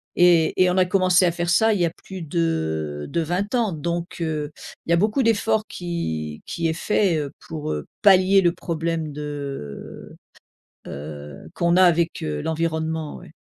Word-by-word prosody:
Et 175 -1 +4
et 180 - +4
on 180 - 0
a 185 - +5
commencé 185 -1 +3
à 175 - +3
faire 175 0 -2
ça 220 +5 +4
il 200 - -1
y - - +4
a 165 - -1
plus 190 -2 -7
de 80 - -2
de 170 - 0
plus 160 - -4
20 200 +7 -1
ans, 230 -5 +1
donc, 170 +3 -3
heu, 155 -2 -2 0.3
il - - -2
y - - +6
a - - +5
beaucoup 215 +8 +2
d'efforts 220 -1 +2
qui 80 - -4
qui 165 -1 -2
est 160 - 0
fait, 190 0 +1
heu, 145 -2 -3 0.2
pour, 155 - -4
heu, 75 -1 -4 0.2
pallier 195 0 +6
le 175 -2 +3
problème 165 -2 -3
de, 140 - -7 0.7
heu - - -7
heu, 75 0 -8
qu'on 170 0 +2
a 185 - +6
avec, 170 -2 +3
heu, 75 -1 -2
l'environnement, 160 -1 -2
ouais. 175 -3 -13
170 Hz, 190 wpm, -23 LUFS, 150-180 Hz, 0.7 s, y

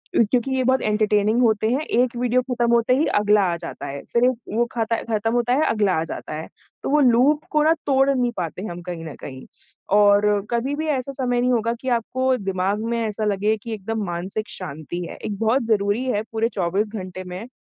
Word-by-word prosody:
क्योंकि 240 +4 +2
ये 260 - +1
बहुत 260 +1 +2
एंटरटेनिंग 215 +1 +2
होते 220 -2 +2
हैं। 260 - +1
एक 250 -5 +1
वीडियो 250 +1 +2
खत्म 245 -2 -1
होते 235 +1 +3
ही 305 - +2
अगला 210 0 +4
आ - - -1
जाता 170 0 -7
है। 140 0 -6
फिर 235 - +3
एक 255 - +5 0.3
वो 240 - +3
खाता 230 -1 0 0.2
ख़त्म 220 +1 0
होता 245 0 +1
है, 290 +4 +3
अगला 210 -4 +2
आ - - 0
जाता 165 - -7
है। 155 +1 -5 0.4
तो - - -2
वो 300 +2 +4
लूप 265 +4 +4
को 300 0 +3
ना 315 +1 +5
तोड़ 270 0 +3
नहीं 250 -3 +1
पाते 175 0 -4
हैं 215 - -5
हम 175 +1 -7
कहीं 175 -2 -6
न 155 - -7
कहीं। 130 -1 -8 0.5
और 205 0 +5 0.3
कभी 245 +4 0
भी 315 +2 -3
ऐसा 275 -3 -1
समय 250 -3 -1
नहीं 250 +1 +2
होगा 230 0 +1
कि 260 - -3
आपको 260 +3 0
दिमाग 195 +1 -1
में 235 - 0
ऐसा 215 0 -3
लगे 210 +1 +1
कि 230 - -5
एकदम 220 +1 -3
मानसिक 185 +5 -4
शांति 160 0 -6
है। - - -8
एक 205 -2 -5
बहुत 225 +4 +2
ज़रूरी 210 +2 +1
है 210 -1 -1
पूरे 225 +1 0
24 195 +1 -1
घंटे 185 -2 -6
में 180 +5 -7
225 Hz, 220 wpm, -22 LUFS, 200-250 Hz, 0.5 s, एक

